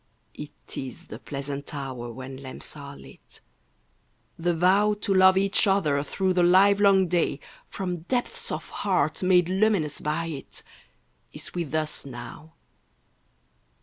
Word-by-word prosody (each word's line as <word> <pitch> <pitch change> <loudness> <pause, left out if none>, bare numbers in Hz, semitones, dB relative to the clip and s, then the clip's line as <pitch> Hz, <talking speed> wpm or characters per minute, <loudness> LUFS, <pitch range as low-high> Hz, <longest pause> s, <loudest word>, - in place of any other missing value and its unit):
It 150 -1 -10
is 135 +6 -6
the - - -8
pleasant 140 +1 -6
hour 130 -4 -5
when 130 +2 -8
lamps 130 +2 -7
are 140 -1 -9
lit, - - -15 1.0
The 170 +1 0
vow 195 +5 +3
To 200 - 0
love 190 0 +6
each 195 +3 +3
other 160 -8 +2
through 185 +5 -1
the 180 - +2
live 195 +3 +5
long 195 -2 +5
day 170 -4 0 0.3
From 180 -2 -4
depths 245 +9 -2
of - - -4
heart - - +1
made 180 -2 +4
luminous 190 -6 +1
by 155 +3 -1
it. 150 -5 -7 0.7
Is - - -8
with 165 -4 -3
us 155 -1 -1
now. 140 +5 -10
170 Hz, 140 wpm, -26 LUFS, 140-190 Hz, 1.0 s, love